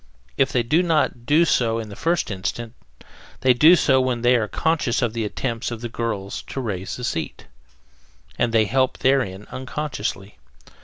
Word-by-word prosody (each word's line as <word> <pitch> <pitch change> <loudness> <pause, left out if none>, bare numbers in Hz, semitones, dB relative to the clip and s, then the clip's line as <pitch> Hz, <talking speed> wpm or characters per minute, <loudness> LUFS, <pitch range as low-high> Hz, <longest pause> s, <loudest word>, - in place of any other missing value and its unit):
If 135 0 +2
they 120 - +1
do 150 +9 +2
not 155 -8 0
do 155 +4 +5
so 115 -7 +1
at 110 - -5
the 100 - -9
first 165 -4 0
instant, 105 +4 -4 0.7
they 130 -1 +5
do 155 +8 +7
so 130 -6 +3
when 125 -2 -1
they 125 +1 +5
are 110 -3 +1
conscious 150 -2 0
of 115 -2 0
the 115 -1 -2
attempts 115 +2 -3
of 115 -2 -6
the 120 - -4
girl 105 -4 -3
to - - -6
raise 100 -7 -4
the 125 - -8
seat, 80 - -4 0.9
and 120 - 0
they 110 -1 +3
help 130 +3 +1
therein 115 -7 +1
unconsciously. 120 - -5
120 Hz, 175 wpm, -22 LUFS, 110-135 Hz, 0.9 s, do